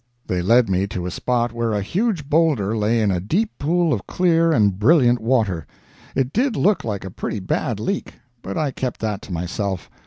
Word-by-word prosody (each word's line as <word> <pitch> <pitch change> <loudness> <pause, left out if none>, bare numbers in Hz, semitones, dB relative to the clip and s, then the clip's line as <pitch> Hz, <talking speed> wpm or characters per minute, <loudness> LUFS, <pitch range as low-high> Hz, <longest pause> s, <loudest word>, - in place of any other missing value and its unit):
They 90 -1 -1
led 115 +6 +4
me 95 +1 0
to 95 -4 -5
a 90 - -3
spot 120 +3 0
where 115 -1 -1
a 105 -1 -1
huge 185 - -1
boulder 145 -10 +2
lay 110 +2 +1
in 105 -2 +2
a 90 - 0
deep 185 - 0
pool 165 +2 +2
of 105 - -4
clear 165 -2 +2
and 100 -9 +2
brilliant 125 -1 +4
water. 110 - 0 0.5
It 135 0 0
did 250 +1 +1
look 195 -5 +2
like 100 -4 -4
a 95 - -6
pretty 105 - -4
bad 100 +3 -2
leak, 195 - -3 0.3
but 95 - -5
I 150 -3 0
kept 130 -1 -4
that 105 -3 -2
to - - -11
myself. 90 +2 -3
115 Hz, 205 wpm, -21 LUFS, 100-155 Hz, 0.5 s, led